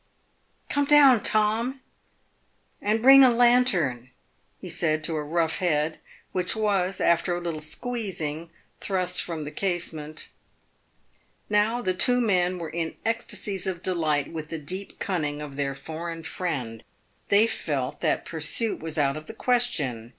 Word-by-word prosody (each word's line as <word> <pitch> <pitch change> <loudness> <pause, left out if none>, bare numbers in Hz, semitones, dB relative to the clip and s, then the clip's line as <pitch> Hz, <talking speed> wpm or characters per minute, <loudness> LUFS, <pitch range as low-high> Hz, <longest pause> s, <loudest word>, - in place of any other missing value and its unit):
" - - -41
Come 285 0 +1
down, 280 -5 +7
Tom, 220 +6 +1 1.0
and 220 +2 0
bring 270 +1 +9
a 255 - +8
lantern," 230 - +2 0.5
he - - -9
said 155 -2 0
to 160 +1 -1
a 155 - -1
rough 160 +1 0
head, 160 -3 0 0.3
which 180 +2 0
was, 195 -3 0
after 170 +1 +2
a - - -3
little 170 -3 -4
squeezing, 170 -4 -3 0.3
thrust 185 -2 0
from 165 -3 -5
the 145 - -6
case 175 0 -1
ment. 155 0 -8 1.2
Now 220 +4 +2
the 185 - +1
two 245 +7 +3
men 185 -6 +1
were 165 -2 -6
in 165 -1 -3
ecstasies 210 -4 -2
of 185 -2 -4
delight 155 -6 0
with 155 -1 -6
the 165 - -4
deep 185 +6 -5
cunning 150 -6 -2
of 150 -2 -8
their 140 -1 -2
foreign 165 +3 -7
friend. 130 -11 -4 0.5
They 205 +2 +5
felt 140 - -3
that - - 0
pursuit 165 +8 0
was 160 -1 -4
out 140 -2 +1
of 155 - -10
the 225 - -8
ques 245 +1 +2
tion. 125 - -4
175 Hz, 155 wpm, -25 LUFS, 155-215 Hz, 1.2 s, bring